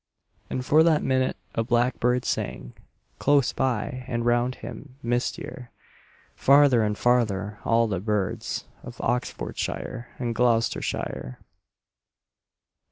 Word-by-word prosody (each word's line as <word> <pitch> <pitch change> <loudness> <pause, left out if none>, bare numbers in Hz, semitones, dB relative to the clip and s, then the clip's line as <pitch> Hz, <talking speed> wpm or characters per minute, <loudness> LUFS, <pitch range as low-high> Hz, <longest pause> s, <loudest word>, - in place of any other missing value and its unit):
And 125 - -3
for 155 +3 +5
that 160 -2 +4
minute 130 -1 +1 0.2
a 115 - 0
blackbird 125 +1 +1
sang - - -3 0.5
Close 140 -2 +3
by, 130 0 -1
and 120 -2 -2
round 120 +1 +2
him, 135 -3 -9
mistier, 120 +1 -3 0.6
Farther 140 -3 +5
and 105 -1 0
farther, 105 -4 +1
all 115 0 +3
the 100 -5 -1
birds 105 -1 -2 0.2
Of - - -10
Oxfordshire 120 -1 -3
and 120 -2 -2
Gloustershire. 115 - 0
120 Hz, 105 wpm, -26 LUFS, 115-130 Hz, 0.6 s, for